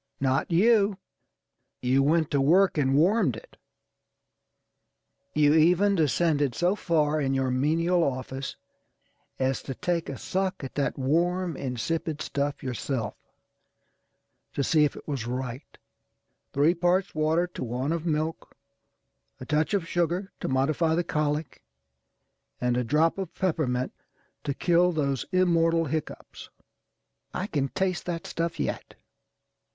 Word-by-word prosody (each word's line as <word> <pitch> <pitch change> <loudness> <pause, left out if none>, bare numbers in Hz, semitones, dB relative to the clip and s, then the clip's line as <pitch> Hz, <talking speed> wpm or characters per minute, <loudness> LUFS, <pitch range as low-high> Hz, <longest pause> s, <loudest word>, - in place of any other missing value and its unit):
Not 135 +2 +1
you. 200 +2 +4 0.8
You 130 +2 +2
went 155 +2 +2
to 140 - +2
work 180 +7 +4
and 135 -3 +2
warmed 175 - +3
it. 110 - -13 1.8
You 150 -1 +5
even 180 +6 +4
descended 150 - +1
so 175 - +2
far 155 -5 +1
in 135 -1 0
your 135 -1 0
menial 165 +7 +2
office 130 -1 -3 0.8
as 130 0 0
to 135 - -6
take 175 +1 -1
a 135 - -5
suck 190 -4 -2
at 135 - -6
that 140 -1 -1
warm, 170 +5 0
insipid 150 +5 -3
stuff 145 -1 -2
yourself, 125 -1 -3 1.4
to 140 - -1
see 150 +1 +4
if 145 - -2
it - - -12
was 135 -6 -3
rightâ€"three 125 - -4
parts 180 +2 +1
water 155 +3 +2
to - - -5
one 125 +4 -2
of 165 -1 -1
milk, 160 -1 -3 0.8
a 130 - -8
touch 155 +7 +1
of 175 -4 -1
sugar 175 +3 -1
to - - -3
modify 155 +5 +1
the 175 - +1
colic, 150 -2 -2 1.0
and 125 -1 +1
a 125 - +1
drop 155 +9 +2
of 190 -4 -5
peppermint 145 -9 -1 0.5
to 140 - -1
kill 175 +2 +3
those 140 -5 -1
immortal 165 -3 +3
hiccoughs. 155 +1 -5 0.9
I 185 - -1
can 145 -9 -1
taste 185 +5 -2
that 170 -1 -3
stuff 165 0 -3
yet. - - -3
155 Hz, 130 wpm, -27 LUFS, 135-175 Hz, 1.8 s, You